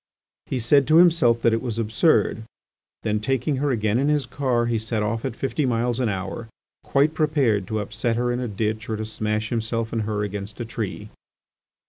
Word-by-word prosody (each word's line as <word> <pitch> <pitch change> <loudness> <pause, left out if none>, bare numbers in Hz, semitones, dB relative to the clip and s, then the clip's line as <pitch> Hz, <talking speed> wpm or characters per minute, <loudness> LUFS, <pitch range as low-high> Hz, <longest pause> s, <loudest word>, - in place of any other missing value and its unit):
He 130 - -2
said 130 +3 +3
to 155 - +4
himself 160 -9 +5
that 115 - +4
it 115 - 0
was 120 -3 -4
absurd; 115 +2 +2 0.6
then, 105 -1 0
taking 135 +5 0
her 145 +2 0
again 110 -2 +1
in 140 - +1
his 150 -2 +1
car 125 -1 0
he 115 -1 0
set 110 0 -2
off 115 +2 -2
at - - -3
fifty 135 +4 -1
miles 120 -1 0
an 125 -3 +1
hour 100 +4 -4 0.3
quite 145 +3 +2
prepared 140 -11 +1
to 110 - -2
upset 110 +3 -2
her 120 +1 0
in 120 - -1
a 125 - -2
ditch 110 +1 -3
or 110 - -1
to 110 - -3
smash 110 0 -2
himself 115 -1 -2
and 115 - 0
her 105 -1 -2
against 100 +1 -5
a 120 - -3
tree. 110 -2 -5
115 Hz, 200 wpm, -23 LUFS, 110-130 Hz, 0.6 s, himself